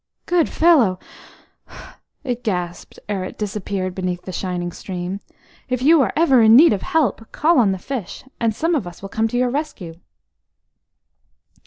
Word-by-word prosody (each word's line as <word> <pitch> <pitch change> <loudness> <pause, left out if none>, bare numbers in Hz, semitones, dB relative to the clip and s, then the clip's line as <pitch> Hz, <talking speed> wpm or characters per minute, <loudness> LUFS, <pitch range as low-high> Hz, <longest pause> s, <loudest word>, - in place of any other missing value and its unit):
"Good 350 -3 +2
fellow!" 285 - +4 1.3
it 245 -3 -4
gasped, 180 -5 -4
ere 200 -3 -2
it 185 - -8
disappeared 195 -2 -3
beneath 180 -1 -3
the 185 - -7
shining 180 -1 -3
stream. 180 +2 -5 0.5
"If 255 -1 -1
ever 265 - +1
you 325 -1 +6
are 270 -2 +3
in 220 0 +7
need 300 0 +7
of 195 - -3
help, 255 -8 -1
call 315 -1 +3
on 210 -5 +3
the 190 - -2
fish, 225 0 -6 0.2
and 225 -2 0
some 330 +7 0
of 270 - -1
us 175 +2 -11
will 195 - -6
come 220 +2 0
to 245 - -3
your 250 0 +1
rescue." 275 - -4
220 Hz, 165 wpm, -20 LUFS, 185-270 Hz, 1.3 s, in